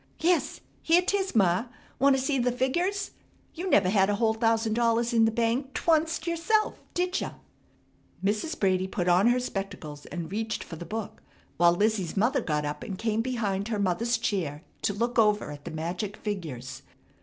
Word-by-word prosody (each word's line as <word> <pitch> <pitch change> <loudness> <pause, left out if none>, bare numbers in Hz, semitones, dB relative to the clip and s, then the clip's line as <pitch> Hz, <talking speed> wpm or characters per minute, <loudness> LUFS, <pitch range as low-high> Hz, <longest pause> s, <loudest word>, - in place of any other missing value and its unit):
"Yes, 345 +2 +1 0.2
here 340 +2 +4
'tis 390 -3 -1
ma! 190 0 +3 0.3
Wanta 275 0 +5
see 270 +1 0
the 250 0 +2
figgers? 350 +11 -1 0.4
You 370 +3 -4
never 200 - +4
had 195 0 +3
a 205 - +2
whole 220 +1 +2
thousand 225 -1 +1
dollars 235 +1 +2
in 225 -1 +5
the 225 - +2
bank 235 +4 -1
t'woncet 320 0 +1
yerself, 345 +6 +1
did 360 +1 0
ya?" - - -4 0.9
Mrs. 215 +11 -1
Brady 185 -1 +2
put 180 -1 -2
on 180 +5 +5
her 245 +1 +4
spectacles 195 -10 -5
and 170 -1 -6
reached 220 +1 -2
for 165 - -9
the 170 - -8
book, 220 +2 -5 0.4
while 170 0 +5
Lizzie's 205 -3 0
mother 250 +6 +2
got 150 -6 -1
up 145 0 -4
and 195 - -5
came 225 +1 0
behind 215 -5 -1
her 225 -2 -1
mother's 200 +5 +1
chair 160 -6 -2 0.2
to 210 - +1
look 235 +2 0
over 210 -7 +3
at 145 0 -10
the - - -4
magic 175 +6 -4
figures. 150 - -5
220 Hz, 180 wpm, -27 LUFS, 185-255 Hz, 0.9 s, Wanta